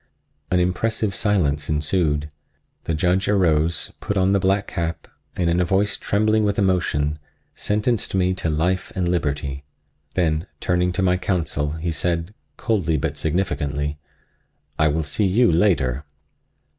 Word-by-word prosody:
An 90 - +2
impressive 100 +4 0
silence 75 -10 +1
ensued. 75 -1 +1 0.6
The 80 - -1
Judge 90 +4 +1
arose, 85 -5 +2
put 100 - -2
on 95 +1 +3
the 100 - +3
black 95 +1 +1
cap 85 0 -4 0.3
and 90 - 0
in 85 +1 +2
a - - +4
voice 95 +4 +1
trembling 110 +1 +1
with 100 -1 0
emotion 75 -6 +1 0.3
sentenced 105 0 -1
me 95 -1 +2
to 90 -3 -2
life 90 +4 0
and 90 -2 0
liberty. 70 -5 -1 0.5
Then 80 -1 +1
turning 90 0 +1
to 95 - 0
my 90 0 +3
counsel 80 -6 -1
he 80 +1 -3
said, 85 +3 -1 0.2
coldly 85 -8 0
but - - -2
significantly: 75 -4 -1 0.8
"I 80 - +4
will 80 +2 0
see 90 +8 0
you 115 +4 +4
later." 75 -7 +2
90 Hz, 145 wpm, -22 LUFS, 75-95 Hz, 0.8 s, a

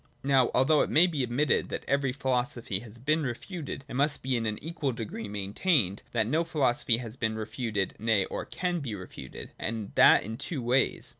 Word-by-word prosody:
Now, 135 -2 +4
although 140 +4 +4
it - - 0
may 165 +4 +6
be 160 -6 -1
admitte 125 +5 +1
that - - -4
every 140 -1 +1
philosophy 125 -5 -1
has 115 0 -11
been 155 +6 +1
refuted, 140 +2 -5
it - - -9
must 140 +3 +1
be 130 0 +1
in 115 -2 0
a: 105 -1 -2
equal 155 -5 -3
degree 115 -1 -5
maintained, 100 - 0
that 115 -2 +1
no 155 +9 +1
philosophy 135 -6 +1
has 115 -2 -6
been 110 -2 -1
re 110 -1 -3
futed, 110 -3 -2
nay, 110 -3 +2
or - - -4
can 180 -1 -2
be 125 -8 -4
refuted. 90 -9 -8
And 110 -2 -3
that - - +7
in 110 +3 -6
two 140 -3 -3
ways. 125 +3 +1
125 Hz, 200 wpm, -28 LUFS, 110-140 Hz, -, that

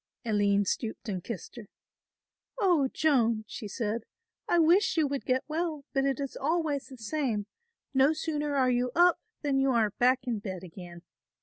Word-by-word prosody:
Aline 205 -2 +2
stooped 225 +4 -3
and 185 -4 -3
kissed 230 +1 -7
her. 220 -3 -9 0.9
"Oh, 350 -10 +3
Joan," 235 -8 +2
she 215 - -7
said, 220 +1 -3 0.5
"I 345 - +4
wish 340 +4 +4
you 315 - +4
would 280 -1 -3
get 255 0 +2
well, 315 -2 -2
but 270 0 +2
it 275 -1 0
is 275 -2 -4
always 300 -1 -1
the 260 - -11
same, 225 -2 -2 0.5
no 270 +2 +5
sooner 300 -2 -2
are 260 -2 +3
you 245 0 +1
up 350 0 +5 0.2
than 280 -2 +1
you 270 0 +3
are 225 -4 +2
back 255 +1 +3
in 235 -4 -1
bed 190 -3 -6
again. 175 -1 -10
260 Hz, 175 wpm, -29 LUFS, 215-295 Hz, 0.9 s, no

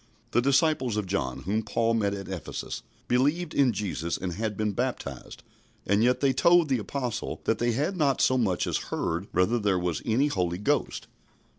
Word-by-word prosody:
The 120 - +3
disciples 135 -3 +2
of 105 - -1
John, 90 -10 -2
whom 105 +5 0
Paul 115 +1 0
met 100 -3 +1
at 95 -1 -7
Ephesus, 95 -3 -5 0.3
believed 150 +7 +1
in 135 -3 +4
Jesus 95 -5 -3
and 90 -2 -4
had 105 +1 -3
been 110 -1 0
baptized, 100 - -4 0.4
and 100 +3 +2
yet 125 +1 +2
they 135 -2 +3
told 170 +3 +4
the 130 -3 +2
Apostle 125 +2 -4
that - - 0
they 120 0 +1
had 150 - -1
not 145 -6 +1
so 130 - +3
much 100 -8 +1
as - - 0
heard 85 +4 -2
whether 100 +7 +2
there 100 -3 +1
was 90 -2 -2
any 120 +5 +2
Holy 90 -11 -1
Ghost. 135 +7 -1
115 Hz, 185 wpm, -27 LUFS, 95-135 Hz, 0.4 s, in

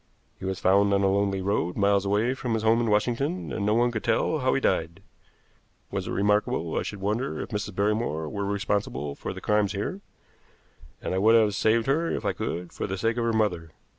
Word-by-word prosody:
He 95 - -7
was 95 0 -2
found 100 +2 +4
on 100 - +1
a - - +4
lonely 100 -1 0
road 95 -3 -1
miles 100 -1 +3
away 105 +5 +2
from 125 -3 -2
his 110 - -2
home 115 +1 +4
in 115 - 0
Washington, 125 - 0
and 100 - -2
no 105 +2 +2
one 120 +1 +3
could 110 -2 -4
tell 155 - +1
how 130 -1 +1
he - - +2
died. 85 -9 -1 0.9
Was - - -3
it - - -4
remarkable 100 -5 +1
I - - +1
should 100 - -6
wonder 110 +7 -1
if - - -5
Mrs. 105 -3 -4
Barrymore 100 -6 0
were 100 +6 -4
responsible 100 -8 -2
for - - -6
the - - -8
crimes 105 -1 +1
here? 145 - -4 1.0
And - - -2
I 95 - +1
would 110 +3 +5
have 110 -3 +4
saved 110 +2 +2
her 160 +5 +1
if - - -3
I - - +1
could, 85 +1 -4
for - - -3
the 95 0 -3
sake 115 +3 0
of 120 - 0
her 115 - +2
mother. 100 -7 0
105 Hz, 225 wpm, -26 LUFS, 100-115 Hz, 1.0 s, would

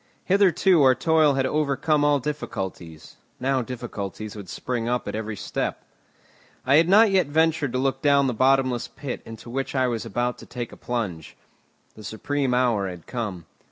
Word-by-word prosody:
Hitherto 185 -3 +4
our 130 -2 +6
toil 160 -3 +3
had 135 -1 +1
overcome 150 +1 +1
all 145 0 +4
difficulties, 95 - -6 0.2
now 130 0 +1
difficulties 110 -4 -6
would 100 -4 -9
spring 120 +1 -3
up 125 0 -1
at - - -3
every 110 0 -4
step. - - -4 0.8
I 135 +3 +5
had 165 +2 +4
not 210 +2 +6
yet 185 -5 +3
ventured 160 -2 +1
to - - 0
look 135 0 0
down 140 -1 +4
the 130 - 0
bottomless 130 0 +2
pit 135 -3 -6
into 115 +1 -10
which 135 +2 -3
I 130 -1 +3
was 115 -4 -2
about 120 +3 -2
to - - -12
take 120 -2 -6
a - - -11
plunge. 100 - -4 0.6
The 110 - -13
supreme 130 +5 -1
hour 115 -6 +1
had 90 -2 -10
come. 105 -9 -5
130 Hz, 175 wpm, -24 LUFS, 115-145 Hz, 0.8 s, our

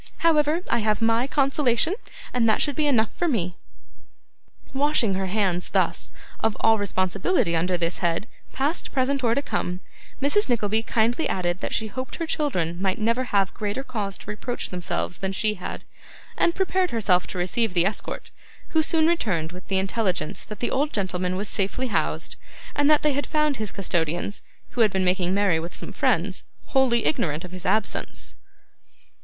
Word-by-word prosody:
However, 310 0 +4
I 235 - +2
have 215 -1 +1
MY 230 +2 +2
consolation, 275 +2 +2 0.4
and 235 -2 +3
that 215 - +3
should 290 -3 0
be 305 -1 +2
enough 230 -6 +2
for 350 - 0
me!' 185 - 0 1.2
Washing 270 -6 +2
her 190 0 -1
hands, 185 -3 0
thus, - - 0 0.3
of 225 -1 0
all 225 -1 +4
responsibility 190 - +1
under 180 +2 +1
this 170 0 -1
head, 170 +3 0 0.3
past, 285 +6 -1
present, 270 0 +1
or 230 -1 +3
to 280 - 0
come, 180 -8 -2 0.4
Mrs. 285 +9 +2
Nickleby 220 -2 +2
kindly 230 +6 +1
added 175 -1 0
that - - -3
she 220 - -1
hoped 255 +5 -5
her 335 - -2
children 180 - -1
might 190 -1 +1
never 230 +4 +1
have 200 -5 +1
greater 210 +5 -3
cause 210 -7 -4
to - - -14
reproach 240 +3 -4
themselves 180 -1 -3
than 190 0 -2
she 215 +2 +1
had, 185 -3 -7 0.5
and 340 - +2
prepared 375 -1 +1
herself 200 - +2
to - - -6
receive 185 +3 0
the 175 0 +4
escort, 205 +2 -3 0.4
who 320 - +3
soon 315 0 +3
returned 200 - +1
with 180 +1 -11
the 190 - +1
intelligence 190 -5 -1
that 210 -2 -9
the 240 - 0
old 290 +3 +1
gentleman 185 -2 -1
was 200 +2 -2
safely 220 +7 -1
housed, 215 - -1 0.4
and 290 0 +3
that 305 -1 +5
they 285 -2 +2
found 300 -2 +1
his 215 -2 -4
custodians, 175 0 0 0.3
who 245 - 0
had 220 - +6
been 190 -1 0
making 180 0 +2
merry 200 -5 +3
with 170 +2 -6
some - - -6
friends, - - 0 0.3
wholly 250 -3 +3
ignorant 155 +2 0
of 180 - -10
his 185 0 -6
absence. 215 -2 -1
215 Hz, 175 wpm, -25 LUFS, 185-265 Hz, 1.2 s, had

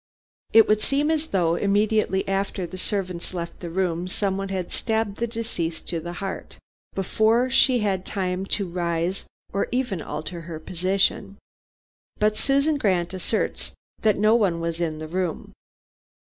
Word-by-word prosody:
It 225 0 +8
would 215 0 +3
seem 285 +5 +2
as 320 0 0
though 175 - +2
immediately 205 +1 +2
after 195 -1 -1
the 180 - -8
servants 185 -2 -2
left 170 -1 -5
the 175 - -5
room 175 0 0
someone 195 +1 -1
had 185 -2 -3
stabbed 220 -3 -1
the 235 - 0
deceased 200 -8 -3
to 170 - 0
the 175 +2 -6
heart, 195 +2 -5 0.4
before 220 +6 +2
she 255 -2 +5
had 195 -3 0
time 190 -1 -2
to 200 -1 0
rise 170 +1 -1 0.3
or 200 - +1
even 245 -8 0
alter 170 +3 -5
her 165 -1 -7
position. 195 +3 0 0.8
But 215 0 +2
Susan 280 +5 +2
Grant 185 -6 +1
asserts 190 +4 -1 0.3
that 215 -2 +3
no 215 +2 +5
one 195 -8 +3
was 165 0 -2
in 160 -2 -1
the 155 0 -6
room. 180 0 -3
195 Hz, 155 wpm, -25 LUFS, 175-215 Hz, 0.8 s, It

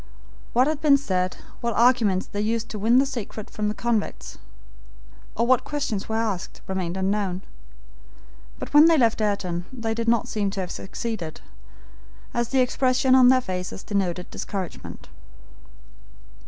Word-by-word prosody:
What 250 +2 +5
had 305 0 -1
been 285 -2 +6
said, 185 -8 -1 0.2
what 235 -2 -2
arguments 230 -6 +3
they 205 - -4
used 225 +1 -1
to 215 - -5
win 230 +4 +4
the 270 - +5
secret 230 -5 -6
from 210 0 -2
the 210 - -2
convict, 235 -3 -2 1.0
or 230 - +2
what 255 0 +3
questions 280 -10 -3
were 220 - -1
asked, 215 -5 -2
remained 185 -2 -3
unknown; 190 -1 -1 1.1
but - - -7
when 295 +2 +9
they 330 -1 +5
left 230 -4 +3
Ayrton, 185 -5 -1
they 230 -3 -3
did 230 +1 -3
not 230 -1 +2
seem 205 -2 -1
to 195 0 -5
have 185 -2 -3
succeeded, 195 -5 -5 0.9
as 240 -1 -1
the 265 -1 +3
expression 255 +1 +2
on 260 -1 +7
their 255 0 +5
faces 185 -3 -5
denoted 185 -3 -2
discouragement. 190 -4 -6
220 Hz, 155 wpm, -24 LUFS, 195-250 Hz, 1.1 s, when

